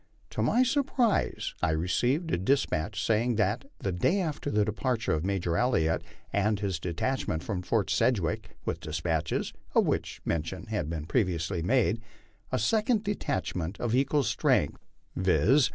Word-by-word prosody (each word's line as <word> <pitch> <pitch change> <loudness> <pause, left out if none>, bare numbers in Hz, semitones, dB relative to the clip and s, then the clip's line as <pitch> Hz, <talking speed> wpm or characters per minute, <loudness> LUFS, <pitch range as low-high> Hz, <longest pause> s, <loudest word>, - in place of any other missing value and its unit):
To - - -2
my 250 - +4
surprise 255 -4 +1
I - - +2
received 120 - +1
a - - +2
despatch 100 - 0
saying 115 +2 +2
that, 105 +5 +1
the 95 - -2
day 90 - +2
after 155 -5 -2
the 105 -5 +2
departure 115 +2 -1
of 80 0 0
Major 90 -3 0
Elliott 80 -10 +2 0.3
and 105 +1 +2
his 95 -5 -1
detachment 85 0 -2
from 95 -3 -2
Fort 105 +2 0
Sedgwick 105 -1 0
with - - -2
despatches, 80 +1 -2 0.2
of - - +5
which - - -1
mention 85 +3 -2
has 105 -8 -2
been 80 -2 -4
previously 90 -3 0
made, 115 +3 +2 0.5
a - - +1
second 215 - +2
detachment 95 - -2
of 120 -2 -1
equal 140 +3 +3
strength, 110 -3 +1 0.3
viz. 95 - +4
105 Hz, 150 wpm, -29 LUFS, 85-130 Hz, 0.5 s, of